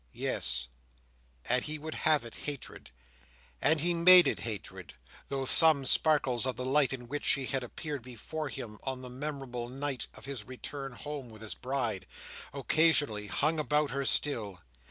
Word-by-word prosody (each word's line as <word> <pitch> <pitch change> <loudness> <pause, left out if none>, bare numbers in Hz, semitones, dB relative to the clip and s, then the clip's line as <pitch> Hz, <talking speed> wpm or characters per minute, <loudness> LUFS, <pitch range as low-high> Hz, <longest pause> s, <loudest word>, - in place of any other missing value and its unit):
Yes, 80 - -1 0.8
and 125 +1 +2
he 155 0 -4
would 155 +1 -6
have 155 -6 +2
it 115 - -8
hatred, 145 - -7 0.7
and 155 0 +3
he 175 +2 +2
made 180 +1 +9
it - - 0
hatred, 105 -8 -6 0.3
though 135 -1 -3
some 155 -1 +5
sparkles 130 -4 +2
of 130 - -2
the 125 - -5
light 135 +1 +3
in 125 -2 -6
which 145 +4 -4
she 135 -2 +1
had 135 +1 -1
appeared 145 +3 -6
before 130 +6 -6
him 115 -6 -7
on 130 -1 -4
the 125 - -8
memorable 130 -3 -5
night 135 0 -3
of - - -12
his 135 -6 -5
return 135 +2 -7
home 145 -1 -7
with 110 0 -12
his 110 - -3
Bride, 120 -8 -3 0.4
occasionally 140 -6 +2
hung 155 +10 0
about 150 -1 +1
her 140 +1 -2
still. 110 - 0
135 Hz, 165 wpm, -31 LUFS, 120-150 Hz, 0.8 s, made